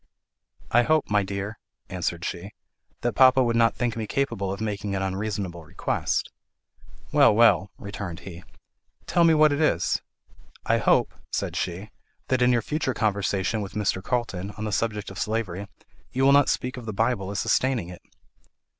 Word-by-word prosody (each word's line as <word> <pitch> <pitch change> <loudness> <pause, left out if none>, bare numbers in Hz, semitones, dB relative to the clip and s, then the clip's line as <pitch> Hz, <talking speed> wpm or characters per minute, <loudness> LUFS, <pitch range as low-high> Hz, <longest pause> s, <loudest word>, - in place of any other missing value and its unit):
"I 120 - +6
hope, 155 -1 +1
my 105 0 +4
dear," 100 +2 -5 0.3
answered 85 -1 -3
she, 90 +3 -5 0.5
"that 120 - 0
papa 130 0 +6
would 120 -1 0
not 115 0 +3
think 120 -2 -1
me 110 -2 -4
capable 100 -7 -1
of 100 - -5
making 105 -2 -3
an 95 - -1
unreasonable 95 -3 -3
request." 75 - -2 0.8
"Well, - - +5
well," 110 -4 +5
returned 100 -4 -6
he; 90 -2 -10 0.6
"tell 170 - +2
me 165 -1 +5
what 155 -1 +5
it 145 +2 0
is." 90 - +1 0.6
"I - - +2
hope," - - +3 0.2
said - - -2
she, 95 +5 -4 0.4
"that 130 -1 +1
in 125 0 +5
your 120 -2 +2
future 150 -2 -2
conversation 100 -1 0
with 100 - -6
Mr. 100 -3 -1
Carlton, 100 -5 -2
on 105 - -5
the 110 - -2
subject 105 -1 -2
of 95 - -8
slavery, 105 -3 -2 0.4
you 130 +1 +1
will 135 - +6
not 140 0 +5
speak 125 0 -2
of 120 -2 -8
the 110 - -3
Bible 110 -2 0
as 100 0 -3
sustaining 125 -9 +1
it." 90 - -10
105 Hz, 170 wpm, -25 LUFS, 95-120 Hz, 0.8 s, I